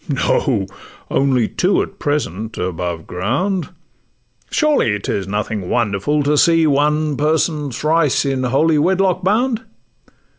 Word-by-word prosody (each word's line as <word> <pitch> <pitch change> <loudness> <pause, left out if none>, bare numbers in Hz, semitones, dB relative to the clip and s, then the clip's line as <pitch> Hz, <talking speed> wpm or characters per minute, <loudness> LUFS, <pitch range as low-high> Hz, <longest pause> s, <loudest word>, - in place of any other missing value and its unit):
'No—only 130 -1 -1
two 185 +2 +1
at 195 - -11
present 115 - -2
above 85 -2 -3
ground: 145 - -2 0.8
Surely 290 - +2
'tis 100 -1 -3
nothing 105 -1 -3
wonderful 120 +6 0
to 145 +1 +2
see 165 -1 +4
One 150 +1 +1
person 150 0 0
thrice 150 +3 +1
in 135 -2 -1
holy 150 +5 +2
wedlock 185 +2 +1
bound! 225 +4 +1
145 Hz, 110 wpm, -18 LUFS, 110-165 Hz, 0.8 s, see